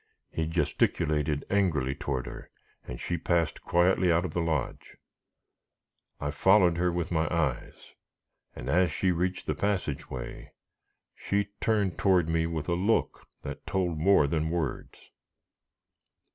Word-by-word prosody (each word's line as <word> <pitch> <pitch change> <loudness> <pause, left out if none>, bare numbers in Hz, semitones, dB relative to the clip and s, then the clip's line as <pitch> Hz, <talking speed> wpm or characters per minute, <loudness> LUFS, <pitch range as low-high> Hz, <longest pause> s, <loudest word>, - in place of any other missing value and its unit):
He 80 -1 -2
gesticulated 75 -2 0
angrily 80 -10 +1
toward 65 -3 -3
her, - - -9 0.4
and - - -6
she 85 -1 -3
passed 85 -1 0
quietly 90 +1 +3
out 85 +2 +2
of 80 - -5
the 85 - 0
lodge. 80 -4 -3 1.2
I 75 0 -2
followed 90 +3 +4
her 90 0 +1
with 85 -1 -3
my 80 -1 +1
eyes, 75 -7 -2 0.6
and - - -7
as 90 0 +3
she 95 +4 +1
reached 90 +2 -1
the 75 - 0
passage 90 -3 -2
way, 60 -2 -7 0.6
she 100 0 -1
turned 105 -5 +1
toward 90 -4 +3
me 80 0 +1
with 80 -3 -4
a 85 - +1
look 95 +6 0 0.2
that - - -7
told 90 -4 -1
more 90 -2 +5
than 80 +2 -1
words. 80 -4 -4
85 Hz, 140 wpm, -28 LUFS, 75-90 Hz, 1.2 s, more